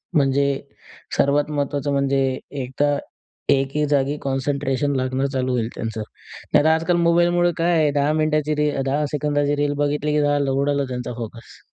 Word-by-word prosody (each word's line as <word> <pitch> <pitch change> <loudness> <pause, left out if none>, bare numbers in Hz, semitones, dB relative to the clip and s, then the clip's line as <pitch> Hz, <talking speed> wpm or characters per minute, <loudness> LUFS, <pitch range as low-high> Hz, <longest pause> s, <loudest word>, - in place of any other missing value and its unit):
म्हणजे 140 -1 +3 0.7
सर्वात 145 +2 +2
महत्त्वाचं 145 -1 -1
म्हणजे, 135 -1 +1 0.2
एकदा 145 +3 0 0.6
एके 140 +2 0
जागी 140 0 +1
कॉन्सन्ट्रेशन 140 0 -1
लागणं 130 +1 0
चालू 130 -1 0
होईल 120 -3 0
त्यांचं, 115 -1 -4 0.5
नाहीतर 155 - +5
आजकाल 165 +2 +2
मोबाईलमुळे 175 +1 +3
काय 170 +1 +2
आहे, 155 -2 +3
10 145 +1 +1
मिनिटाची 155 -1 +1
रील 150 -2 0
10 145 +3 0
सेकंदाची 145 -1 0
रील 145 0 0
बघितली 145 +1 0
की 150 - +2
उडाला 140 -1 +1
त्यांचा 125 -1 -4
फोकस. 115 0 -9
145 Hz, 145 wpm, -22 LUFS, 135-150 Hz, 0.7 s, नाहीतर